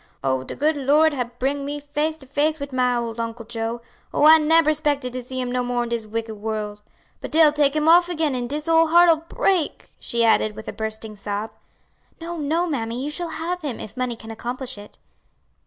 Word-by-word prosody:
"Oh, 130 Hz, -1 st, 0 dB
de -, -, -7 dB
good 305 Hz, +2 st, +1 dB
Lord 295 Hz, +3 st, +3 dB
hab 245 Hz, -3 st, -4 dB
bring 275 Hz, +3 st, -1 dB
me 290 Hz, +1 st, -4 dB
face 295 Hz, +2 st, -2 dB
to 280 Hz, -, -12 dB
face 295 Hz, +3 st, 0 dB
wid 280 Hz, -1 st, -6 dB
my 250 Hz, -1 st, +2 dB
ole 235 Hz, -1 st, -3 dB
Uncle 230 Hz, 0 st, -5 dB
Joe; 230 Hz, +1 st, -4 dB, 0.3 s
oh, -, -, +2 dB
I 315 Hz, +1 st, +9 dB
neber 310 Hz, 0 st, +4 dB
'spected 290 Hz, -4 st, -1 dB
to 255 Hz, -, -3 dB
see 260 Hz, +1 st, -6 dB
him 250 Hz, -1 st, -2 dB
no 250 Hz, 0 st, 0 dB
more 245 Hz, 0 st, -1 dB
in 240 Hz, -, -5 dB
dis 230 Hz, -2 st, -3 dB
wicked 225 Hz, +1 st, -4 dB
world. 210 Hz, -1 st, -4 dB, 0.4 s
But -, -, -6 dB
dey'll 310 Hz, -1 st, +5 dB
take 290 Hz, -1 st, +2 dB
'im 305 Hz, 0 st, +1 dB
off 345 Hz, +2 st, +6 dB
again 320 Hz, -4 st, 0 dB
an' 245 Hz, -1 st, -2 dB
dis 295 Hz, +4 st, -4 dB
ole 330 Hz, 0 st, +5 dB
heart'll 340 Hz, 0 st, +6 dB
break," 360 Hz, -6 st, 0 dB
she 235 Hz, -1 st, 0 dB
added, 215 Hz, -1 st, +3 dB
with 220 Hz, +1 st, -9 dB
a -, -, -4 dB
bursting 220 Hz, 0 st, -5 dB
sob. 205 Hz, +2 st, -4 dB, 0.7 s
"No, 340 Hz, +1 st, -6 dB
no, 320 Hz, +3 st, 0 dB
mammy, 240 Hz, -7 st, -3 dB
you 295 Hz, -, -3 dB
shall 345 Hz, +2 st, -3 dB
have 345 Hz, +3 st, -4 dB
him, 280 Hz, -7 st, -4 dB
if 215 Hz, -, -8 dB
money 250 Hz, -2 st, -2 dB
can 225 Hz, 0 st, -10 dB
accomplish 250 Hz, +3 st, -5 dB
it." 205 Hz, 0 st, -13 dB
260 Hz, 220 wpm, -23 LUFS, 230-310 Hz, 0.7 s, I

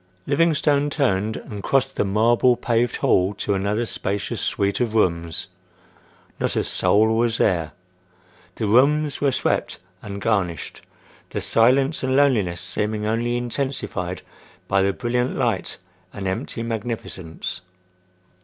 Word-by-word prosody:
Livingstone 145 Hz, -1 st, +2 dB
turned 110 Hz, -8 st, 0 dB
and 105 Hz, -2 st, -8 dB
crossed 135 Hz, +4 st, +1 dB
the -, -, +1 dB
marble 115 Hz, +5 st, +3 dB
paved 120 Hz, 0 st, 0 dB
hall 95 Hz, +2 st, +2 dB
to 100 Hz, -, -1 dB
another 100 Hz, +4 st, 0 dB
spacious 100 Hz, -2 st, -3 dB
suite 100 Hz, 0 st, 0 dB
of 115 Hz, -3 st, -1 dB
rooms. 85 Hz, -6 st, 0 dB, 0.9 s
Not -, -, -1 dB
a -, -, +1 dB
soul 110 Hz, +2 st, +2 dB
was 115 Hz, 0 st, +1 dB
there. 85 Hz, -6 st, +1 dB, 0.8 s
The 110 Hz, -, -2 dB
rooms 140 Hz, +7 st, +3 dB
were 140 Hz, -1 st, +3 dB
swept 130 Hz, -, -1 dB, 0.2 s
and 100 Hz, -1 st, -6 dB
garnished, 95 Hz, -7 st, -1 dB, 0.5 s
the -, -, -3 dB
silence 135 Hz, +6 st, +3 dB
and 130 Hz, 0 st, 0 dB
loneliness 115 Hz, -12 st, +2 dB
seeming 105 Hz, +4 st, -2 dB
only 120 Hz, +2 st, 0 dB
intensified 120 Hz, -7 st, -3 dB, 0.4 s
by 95 Hz, 0 st, +2 dB
the 100 Hz, +1 st, +2 dB
brilliant 125 Hz, +3 st, -1 dB
light -, -, -1 dB, 0.3 s
and 100 Hz, -, -6 dB
empty 95 Hz, +4 st, -3 dB
magnificence. 110 Hz, -7 st, -5 dB
110 Hz, 125 wpm, -22 LUFS, 100-125 Hz, 0.9 s, marble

